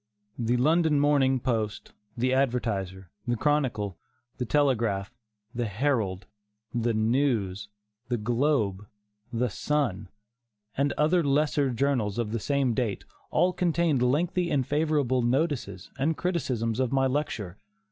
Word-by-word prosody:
The 120 +1 +1
London 155 +3 +3
Morning 140 -2 +3
Post, 110 -5 -2 0.2
the 130 +2 +1
Advertiser, 100 -9 -1 0.2
the 120 - +1
Chronicle, 120 -8 0 0.4
the 125 - -1
Telegraph, 115 -8 +1 0.4
the 120 -1 -1
Herald, 105 -4 -1 0.5
the 120 -1 0
News, 110 -4 0 0.4
the 120 -1 0
Globe, 115 -4 0 0.4
the 125 +1 0
Sun, 110 -9 -1 0.7
and 140 +1 +1
other 165 +3 +2
lesser 145 -1 +2
journals 120 -5 0
of 115 -3 -1
the 115 - -1
same 140 +1 +1
date, 115 -5 -2 0.2
all 180 +1 +2
contained 170 -6 +1
lengthy 170 +7 +1
and 135 -3 +1
favorable 145 -4 +1
notices 125 - -1
and 155 +4 +1
criticisms 125 -10 -1
of 130 -2 +1
my 135 -1 +2
lecture. 125 - -2
125 Hz, 125 wpm, -27 LUFS, 110-145 Hz, 0.7 s, London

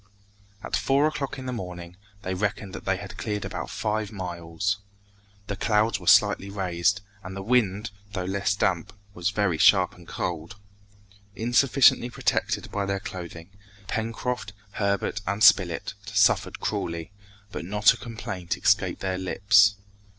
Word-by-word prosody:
At - - -2
four 140 +2 +2
o'clock 145 -3 -2
in 130 - -7
the 125 - -3
morning, 90 -5 -7 0.3
they 95 - -2
reckoned 100 0 -2
that - - -8
they - - +1
had - - -9
cleared 105 -1 -3
about - - -5
five 105 -1 -2
miles. 90 +1 -3 0.7
The 100 - -4
clouds 105 0 +1
were 90 - -12
slightly 105 0 +5
raised, 95 0 0 0.2
and 95 0 -7
the 95 - -5
wind, 105 -2 +1 0.2
though 90 -3 -2
less 100 +1 0
damp, 95 0 0 0.2
was 90 +1 -1
very 100 -5 0
sharp - - +5
and 90 -1 -16
cold. 85 0 -4 0.8
Insufficiently 120 +3 +4
protected - - -1
by 100 -1 -2
their 100 0 -1
clothing, 85 -2 -8 0.4
Pencroft, 115 +1 -3 0.2
Herbert 100 0 -1
and 100 +2 0
Spilett 95 -4 +4 0.2
suffered 100 -1 +2
cruelly, 85 0 -3 0.4
but - - -5
not 105 +3 +4
a - - -9
complaint 100 -7 -5
escaped 100 -3 +2
their 95 -1 -2
lips. 100 +2 +4
100 Hz, 145 wpm, -26 LUFS, 90-105 Hz, 0.8 s, slightly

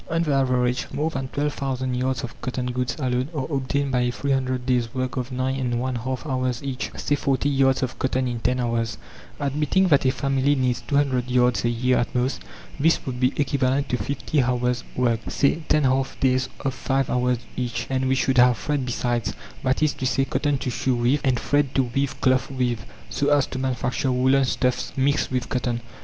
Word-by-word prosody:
On 165 +1 +1
the 150 -3 0
average, 125 -2 +1
more 155 +2 -1
than 135 -3 -3
12,000 135 -2 -2
yards 130 +2 -1
of 115 - -8
cotton 125 0 -3
goods 125 0 -2
alone 130 -1 -1
are 135 -3 -1
obtained 140 +1 -1
by 125 - +2
a 125 0 +2
300 130 -1 -1
days' 125 -3 +1
work 130 0 -2
of 125 0 -3
nine 130 +1 -1
and 120 -2 -1
one 130 +1 -1
half 130 +3 -3
hours 130 -3 -1
each, 135 -2 -3
say 145 - -1
40 140 -1 +1
yards 135 -1 +3
of 130 - -4
cotton 130 0 0
in 120 -1 -3
10 125 +2 0
hours. 115 -1 -1 0.4
Admitting 150 +7 +1
that 140 -3 +4
a 130 - +4
family 135 +2 +1
needs 125 -2 0
200 135 -4 +1
yards 125 -1 +3
a - - +3
year 125 +2 +2
at 120 - -2
most, 125 +2 0 0.4
this 165 +3 +2
would 125 -2 -4
be 125 +1 +3
equivalent 140 -1 +1
to 125 - +1
50 140 +2 -1
hours' 125 -1 0
work, 120 -3 +2
say 145 +3 +1
10 150 - +4
half 130 0 +1
days 130 -1 +2
of 135 -2 -1
5 135 +1 -1
hours 125 0 +2 0.2
each. 125 -2 -2
And 130 0 0
we 130 - +3
should 130 -1 +2
have 125 -1 +6
thread 145 +1 -1
besides; 120 -1 -1 0.3
that 130 +3 +1
is 150 -3 +3
to 130 - -2
say, 135 +1 +1
cotton 145 0 0
to 130 - -3
sew 130 +2 0
with, 120 +4 +2
and 130 -4 +2
thread 145 -2 +1
to 135 - +4
weave 135 +2 -2
cloth 130 0 +2
with, 125 -4 -2 0.2
so 145 - +1
as 145 -2 +4
to 130 - -6
manufacture 130 0 -1
woolen 130 +2 +3
stuffs 125 0 -1
mixed 140 +2 +2
with 125 -1 -2
cotton. 120 -2 -1
130 Hz, 205 wpm, -24 LUFS, 125-135 Hz, 0.4 s, have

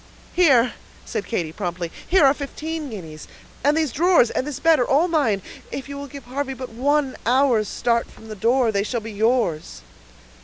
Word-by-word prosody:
"Here," 265 -9 +4 0.3
said - - -4
Katy, 170 -9 -2
promptly, 175 -2 -4 0.2
"here 360 -5 +5
are 270 - +6
fifteen 305 +2 -5
guineas, 160 -8 -9 0.4
and 290 +3 +3
these 315 -5 +1
drawers 340 -5 +4
and 265 - -2
this 285 -2 -5
bed 325 -1 +4
are 245 - +1
all 300 +6 +3
mine; 270 - +1 0.3
if 270 - -5
you 280 - -7
will 280 0 -6
give 280 0 -10
Harvey 270 +2 -4
but 255 0 -7
one 275 +3 0
hour's 245 -3 +3
start 235 +2 0
from 220 - -15
the 215 - -7
door, 235 +3 +2
they 200 -2 +1
shall 235 +4 -2
be 220 +1 -7
yours." 205 - 0
255 Hz, 190 wpm, -22 LUFS, 220-285 Hz, 0.4 s, are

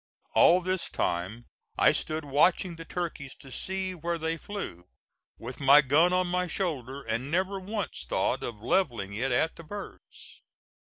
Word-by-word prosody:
All 180 +2 +6
this 185 0 -1
time 95 +7 -2 0.3
I - - +6
stood 155 0 -2
watching 170 +5 +2
the 165 0 -9
turkeys 160 -7 -5
to 135 - -14
see 190 +6 -2
where 170 0 -3
they 160 0 -1
flew 160 - -7 0.5
with 125 +5 -8
my 140 +1 +7
gun 150 +6 +4
on 185 0 +2
my 180 +1 0
shoulder, 140 -8 -3
and 115 +4 -2
never 190 +4 0
once 200 - -4
thought - - 0
of 110 -3 -6
levelling 115 - 0
it 125 +5 -1
at 160 +7 +1
the 165 - -9
birds. 205 +6 -10
160 Hz, 160 wpm, -28 LUFS, 130-180 Hz, 0.5 s, my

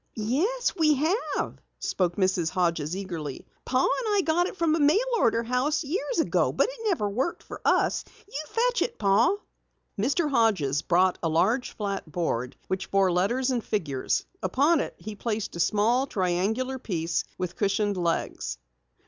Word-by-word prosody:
"Yes, 340 - 0
we 305 -2 +4
have," 325 - -1 0.2
spoke 175 -2 -1
Mrs. 185 -4 +1
Hodges 170 -2 0
eagerly. 165 -8 -5 0.2
"Pa 255 0 +2
and 435 - +1
I 395 - +3
got 345 +3 +2
it 380 - -8
from 335 -3 +2
a 325 - +1
mail 300 +5 +5 0.2
order 230 0 +2
house 255 +7 0
years 385 - -2
ago, - - +2
but - - +2
it - - -8
never 320 - +1
worked 250 +11 -2
for - - -9
us. - - +2 0.2
You 305 -7 -5
fetch 485 +5 +1
it, 475 - -1
Pa." 205 - +3 0.6
Mr. 280 - +1
Hodges 205 - +2
brought 180 +1 +2
a 165 - 0
large, 220 +11 +1
flat 200 -6 -3
board 125 -7 -2
which 190 0 -3
bore 195 -2 +3
letters 240 +9 +1
and 240 -3 -1
figures. 145 -11 -1 0.2
Upon 285 - +3
it - - -3
he 210 +5 -7
placed 215 -1 -3
a - - -6
small, 230 +8 +2
triangular 215 +7 -1
piece 170 -7 -1
with 180 -1 -4
cushioned 205 0 +1
legs. 165 - -2
215 Hz, 165 wpm, -27 LUFS, 180-290 Hz, 0.6 s, mail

